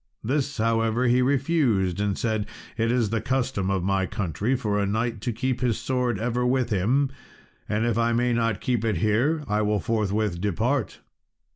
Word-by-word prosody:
This, 140 +3 -1
however, 115 +1 +1
he 125 +1 +4
refused, 125 - +1
and 100 -1 0
said, 110 -2 -1 0.3
"It 115 +1 +1
is 120 -4 +1
the 115 - 0
custom 130 -7 -1
of 95 -2 0
my 95 0 +1
country 100 - -1
for 105 -5 -1
a 100 - +1
knight 110 +1 -1
to 120 - -1
keep 125 +2 -2
his 120 -3 +1
sword 125 -2 -1
ever 120 +2 -1
with 125 -1 +1
him; 125 +8 +2 0.6
and 105 +2 +1
if 115 -1 +1
I 115 0 +2
may 120 +1 +1
not 115 -3 0
keep 120 -4 0
it 110 -5 0
here, 120 - +1
I 105 0 +1
will 105 0 +1
forthwith 105 -5 -1
depart." 110 +6 -1
115 Hz, 180 wpm, -25 LUFS, 105-125 Hz, 0.6 s, he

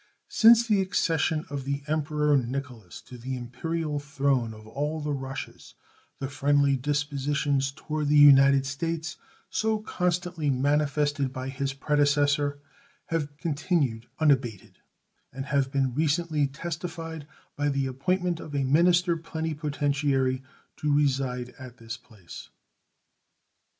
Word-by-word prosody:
Since 230 +1 +6
the 210 -4 +3
accession 160 -4 0
of 140 -2 -3
the 140 +1 -3
Emperor 150 -1 +1
Nicholas 125 -6 -4
to 125 -1 -12
the 130 +2 -4
imperial 150 +5 -3
throne 140 -5 0
of 110 -1 -12
all 145 +7 -3
the 150 -1 -2
Russias 135 -1 -7 0.4
the 135 - -4
friendly 140 0 +2
dispositions 145 0 0
toward 150 +1 -3
the 150 +1 +4
United 140 -1 +7
States 160 +4 -3 0.3
so 220 0 +1
constantly 180 -6 -1
manifested 145 0 +1
by 130 0 -5
his 135 0 -3
predecessor 145 0 +2 0.5
have 150 -3 -2
continued 145 -7 -1
unabated, 130 - 0 0.5
and 135 +1 -6
have 140 -2 0
been 135 -3 0
recently 155 0 +1
testified 165 +1 -6 0.3
by 145 0 0
the 140 -1 0
appointment 175 +6 -1
of 145 - -7
a 140 - +1
minister 170 +5 +3
plenipotentiary 145 -5 -1 0.4
to 150 - -1
reside 135 -4 +1
at 125 -2 -10
this 115 0 -7
place. 105 -8 -13
145 Hz, 120 wpm, -27 LUFS, 135-155 Hz, 0.5 s, United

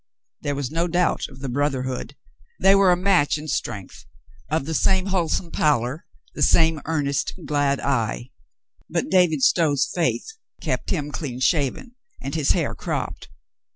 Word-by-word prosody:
There 145 0 -2
was 140 -2 -3
no 165 +2 0
doubt 175 0 +1
of 130 - -14
the 135 - -4
brotherhood. 130 -1 -2 0.4
They 195 - +6
were 195 -2 +5
a 175 - +3
match 180 -6 +3
in 150 +1 -8
strength, 105 - -4 0.4
of 155 -2 0
the 160 - -3
same 190 +4 +2
whole 185 -4 0
some 170 +1 -2
pallor, 140 0 0 0.3
the - - -6
same 160 -2 +4
earnest, 145 -3 -1
glad 145 -2 +1
eye. 120 -2 -1 0.6
But - - -2
David 175 -7 +3
Stow's 150 -6 +3
faith 170 -2 0 0.3
kept - - -2
him 150 -5 -2
clean 135 -5 -5
shaven 145 - 0 0.3
and 135 +1 -5
his 155 -4 +2
hair - - -1
cropped. - - -4
150 Hz, 155 wpm, -23 LUFS, 135-170 Hz, 0.6 s, They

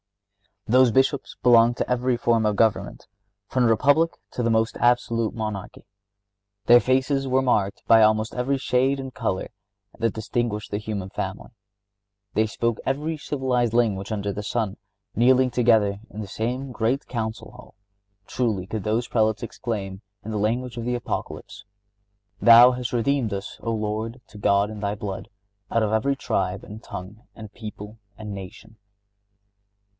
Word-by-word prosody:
Those 125 +1 +5
Bishops 135 +4 +1
belonged 120 -1 +5
to - - -2
every 125 0 +1
form 115 -2 +2
of 105 -1 +1
government, 100 -2 0 0.4
from 125 -1 +1
the - - +4
republic 145 +9 +3 0.2
to - - -3
the 115 - +1
most 110 0 +1
absolute 115 -2 +1
monarchy.(66) 100 -1 -10
Their 120 +1 +8
faces 130 +2 +1
were 130 +1 +2
marked 105 -6 0
by 115 -1 +7
almost 110 0 +3
every 130 +3 0
shade 130 +1 +1
and 135 -1 -6
color 95 -4 -2 0.5
that 115 -2 +1
distinguished 110 -1 -3
the 105 - -1
human 105 -3 -5
family. 95 +4 -5 0.8
They 110 0 +2
spoke 115 +1 -1
every 150 +4 -1
civilized 130 -5 -1
language 110 -4 +1
under 100 -1 -2
the 100 - -5
sun. 105 -1 -2 0.4
Kneeling 130 +2 +4
together 110 -5 +3
in 105 - -7
the 105 - -6
same 125 +6 -3
great 125 +4 -1
Council 110 -2 -4
Hall, 125 0 -15 0.5
truly 110 -7 -1
could 105 +1 -5
those 110 +4 0
Prelates 110 -2 +1
exclaim, 100 -5 -5 0.2
in 110 - -6
the 105 - -2
language 120 +4 -1
of 115 - -4
the 125 0 0
Apocalypse: 105 -3 -5 0.8
"Thou 120 +2 +9
hast 125 -1 -4
redeemed 120 -2 +1
us, 100 0 -6
O 115 - -2
Lord, 110 +2 -3
to - - -13
God 100 +1 +2
in 110 - -7
Thy 100 0 -2
blood, 100 -2 -6 0.4
out 115 - +1
of 105 - 0
every 115 +6 +1
tribe, 95 -7 -2
and 105 +2 -10
tongue, 100 +4 -9
and 110 -2 -10
people, 105 -1 -9 0.2
and 105 -2 -7
nation." 105 +3 -10
110 Hz, 160 wpm, -24 LUFS, 105-125 Hz, 0.8 s, Thou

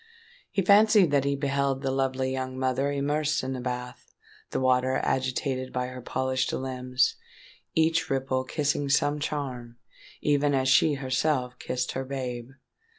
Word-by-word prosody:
He 195 - 0
fancied 205 -3 +6
that 140 -1 +2
he 140 0 +1
beheld 140 -1 -1
the 135 - 0
lovely 130 0 0
young 130 0 -4
mother 130 +2 0
immersed 145 +2 0
in 130 +1 -3
the 130 - -4
bath—the 125 0 -7
water 130 0 +2
agitated 130 0 -1
by 125 0 -2
her 130 0 -8
polished 130 +1 -1
limbs—each 130 +5 -1
ripple 135 -1 0
kissing 145 +1 -1
some 145 +1 +2
charm, 125 -5 -4 0.4
even 145 -1 +2
as 130 -1 +1
she 145 +3 +5
herself 130 -1 -1
kissed 125 0 -2
her 130 - -3
babe! 125 -3 -5
130 Hz, 140 wpm, -27 LUFS, 130-145 Hz, 0.4 s, fancied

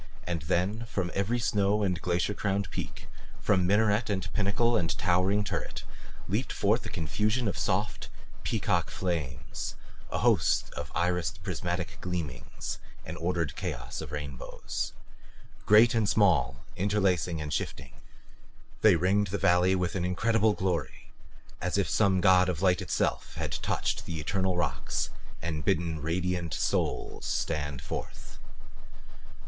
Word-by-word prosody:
And 85 -2 -2
then 95 +8 0
from 95 -6 -2
every 100 +5 +1
snow 105 -2 +2
and 90 -3 0
glacier 90 +3 +1
crowned 100 -1 -1
peak, - - -6 0.3
from 95 -3 +2
minaret 105 +2 +3
and 95 -3 -2
pinnacle 110 +3 +2
and 85 -7 +1
towering 95 +3 +2
turret, - - -4 0.4
leaped - - -1
forth - - +2
a - - -6
confusion 105 +9 0
of 95 - -1
soft - - -1 0.3
peacock - - 0
flames, 75 -6 -3 0.3
a - - -2
host - - +3
of - - -6
irised 90 0 0
prismatic 90 0 -3
gleamings, 85 -9 -4 0.3
an 80 - -5
ordered 85 -2 -1
chaos 65 -10 -4
of - - -7
rainbows. 75 -3 -4 0.7
Great 110 +3 +7
and 110 -3 +2
small, 75 - +3
interlacing 95 -4 +1
and 75 -1 -3
shifting, 65 -1 -3 0.9
they 110 -4 +7
ringed 95 +5 +2
the 100 +2 -2
valley 90 +1 +4
with 90 -2 0
an 95 - -1
incredible 110 +4 +2
glory 90 -4 -2 0.5
as 90 +2 0
if 100 - +2
some 95 -4 +3
god 95 0 +6
of 90 0 -2
light 90 -2 +4
itself - - -1
had - - -3
touched - - -1
the 80 -2 -3
eternal 95 +3 0
rocks 70 -8 -1 0.3
and 80 -3 -2
bidden 80 -2 0
radiant 85 +1 -1
souls - - -1
stand 75 -4 -2
forth. - - -7
90 Hz, 135 wpm, -29 LUFS, 85-100 Hz, 0.9 s, Great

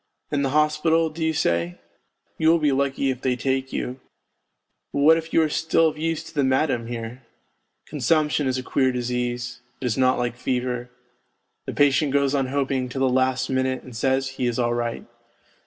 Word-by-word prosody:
In 145 - +1
the 135 - +1
hospital, 155 +2 +2
do 160 +1 -5
you 160 - +2
say? 85 - 0 0.6
You 160 - +4
will 170 - +5
be 150 -3 +2
lucky 135 0 0
if 130 -1 -6
they 130 -1 +1
take 135 +1 -1
you, 125 +2 -4 0.9
but - - -2
what 160 +3 +7
if 165 0 -4
you 165 - +4
are - - +2
still 160 +1 +2
of 155 - -9
use 165 0 -1
to - - -12
the 145 - +1
madam 130 -3 +1
here? 120 +1 -6 0.6
Consumption 150 0 +1
is 130 0 0
a 130 - -4
queer 130 0 +1
disease, 125 0 -3 0.2
it - - -5
is 125 +1 0
not 130 0 +3
like 120 -1 -1
fever. 125 -1 -2 0.8
The - - -3
patient 145 0 +3
goes 140 -1 +2
on 135 -2 +1
hoping 135 -1 -1
till 130 +2 -4
the 135 - +3
last 130 0 +1
minute 130 0 0
and 125 -2 -11
says 130 +3 +1
he 130 -1 -2
is 120 - -1
all 120 -1 +1
right. 120 -1 -3
130 Hz, 195 wpm, -24 LUFS, 125-145 Hz, 0.9 s, what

